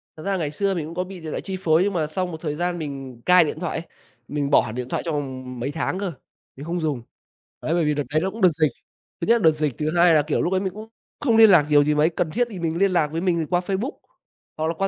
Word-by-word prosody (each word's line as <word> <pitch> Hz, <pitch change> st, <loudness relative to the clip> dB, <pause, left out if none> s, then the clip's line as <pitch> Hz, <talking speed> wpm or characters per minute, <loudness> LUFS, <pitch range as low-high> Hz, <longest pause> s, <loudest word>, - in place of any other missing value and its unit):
Thật 155 Hz, -, -10 dB
ra 195 Hz, -1 st, 0 dB
ngày 155 Hz, -5 st, -2 dB
xưa 195 Hz, +5 st, 0 dB
mình 170 Hz, -5 st, -3 dB
cũng 165 Hz, +2 st, -8 dB
có 180 Hz, -, 0 dB
bị 185 Hz, 0 st, -9 dB
điện 160 Hz, -2 st, -7 dB
thoại -, -, -3 dB
chi 190 Hz, -1 st, -5 dB
phối, 165 Hz, -1 st, +3 dB
nhưng 200 Hz, +1 st, 0 dB
mà 160 Hz, -4 st, 0 dB
xong 180 Hz, +3 st, -3 dB
một 160 Hz, -1 st, -8 dB
thời 150 Hz, -3 st, -3 dB
gian 175 Hz, +1 st, -1 dB
mình 135 Hz, -5 st, -7 dB
cai 180 Hz, -1 st, +7 dB
điện 155 Hz, 0 st, -4 dB
thoại 175 Hz, -1 st, -3 dB
ấy, 165 Hz, -, -6 dB, 0.4 s
mình 145 Hz, -1 st, -2 dB
bỏ 145 Hz, -, +6 dB
hẳn 110 Hz, -, -6 dB
điện 125 Hz, 0 st, -4 dB
thoại -, -, -2 dB
trong 160 Hz, -, -1 dB
vòng 130 Hz, -3 st, -5 dB
mấy 130 Hz, +4 st, -2 dB
tháng 165 Hz, +4 st, -2 dB
cơ, 195 Hz, -3 st, -2 dB, 0.4 s
mình 140 Hz, -, -9 dB
không 175 Hz, +2 st, -2 dB
dùng. 150 Hz, -6 st, -1 dB, 0.6 s
Đấy, 160 Hz, -, 0 dB
bởi 170 Hz, -1 st, +2 dB
vì 150 Hz, 0 st, +1 dB
đợt 145 Hz, -, -1 dB
đấy 155 Hz, +1 st, +2 dB
nó 190 Hz, +3 st, -1 dB
cũng 225 Hz, -, -9 dB
đợt 185 Hz, -, +7 dB
dịch, 155 Hz, -4 st, +1 dB, 0.5 s
thứ 170 Hz, -, -2 dB
nhất 230 Hz, -, +6 dB
là -, -, -3 dB
đợt 160 Hz, -, +7 dB
dịch, 150 Hz, -4 st, -2 dB
thứ 155 Hz, +3 st, -1 dB
hai 170 Hz, 0 st, +6 dB
là, 150 Hz, -, +5 dB
kiểu, 150 Hz, +1 st, -1 dB
lúc 180 Hz, -, 0 dB
đấy 190 Hz, -, +2 dB
mình 190 Hz, -1 st, -3 dB
cũng 215 Hz, +1 st, -9 dB, 0.3 s
không 235 Hz, -6 st, +2 dB
liên 225 Hz, -1 st, +8 dB
lạc 170 Hz, -7 st, +6 dB
nhiều 145 Hz, -1 st, +6 dB
gì 150 Hz, +1 st, +1 dB
mấy, 150 Hz, +2 st, +4 dB
cần 165 Hz, -1 st, -2 dB
thiết 245 Hz, +5 st, +1 dB
thì 190 Hz, -, -7 dB
mình 165 Hz, -1 st, -2 dB
liên 195 Hz, +1 st, +3 dB
lạc 170 Hz, -4 st, +2 dB
với 165 Hz, +1 st, -2 dB
mình 170 Hz, -4 st, 0 dB
qua 175 Hz, -, +2 dB
Facebook 195 Hz, -, -2 dB, 0.7 s
hoặc 155 Hz, 0 st, -1 dB
là 165 Hz, -, 0 dB
qua 195 Hz, +4 st, -1 dB
165 Hz, 310 wpm, -23 LUFS, 150-185 Hz, 0.7 s, liên